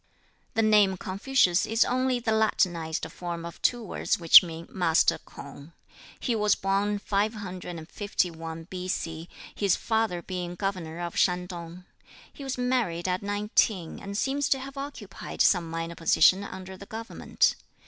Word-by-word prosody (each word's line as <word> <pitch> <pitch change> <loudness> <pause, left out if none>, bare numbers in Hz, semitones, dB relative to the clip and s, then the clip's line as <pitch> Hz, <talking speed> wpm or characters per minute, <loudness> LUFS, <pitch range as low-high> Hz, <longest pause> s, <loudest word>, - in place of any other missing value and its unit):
The 225 - +3
name 210 -3 +4
Confucius 190 -1 +1
is 225 +2 +3
only 255 0 +1
the 230 -2 -1
Latinized 175 -7 +1
form 170 -1 -5
of 170 - -9
two 240 -2 +1
words 210 - -1
which 165 -2 +9
mean 165 -2 -7
"Master 175 -3 +2
K'ung." 140 +3 -12 0.5
He 240 - -1
was 210 -1 +3
born 200 +1 0
551 180 -5 -3
B.C., 175 -2 -4 0.2
his 200 -3 +2
father 220 -6 -1
being 180 -2 -5
governor 175 -4 -4
of 175 -1 -4
Shantung. 180 -1 -1 0.5
He 285 - -10
was 265 -1 -3
married 240 -9 0
at 185 0 0
nineteen, 205 -3 0
and 200 0 -6
seems 275 +4 0
to 270 - +2
have 270 +1 -8
occupied 275 -8 -7
some 175 -4 +3
minor 165 +1 -4
position 170 +3 +4
under 190 -1 -8
the 200 +1 -12
government. 225 +1 0
190 Hz, 140 wpm, -27 LUFS, 170-220 Hz, 0.5 s, which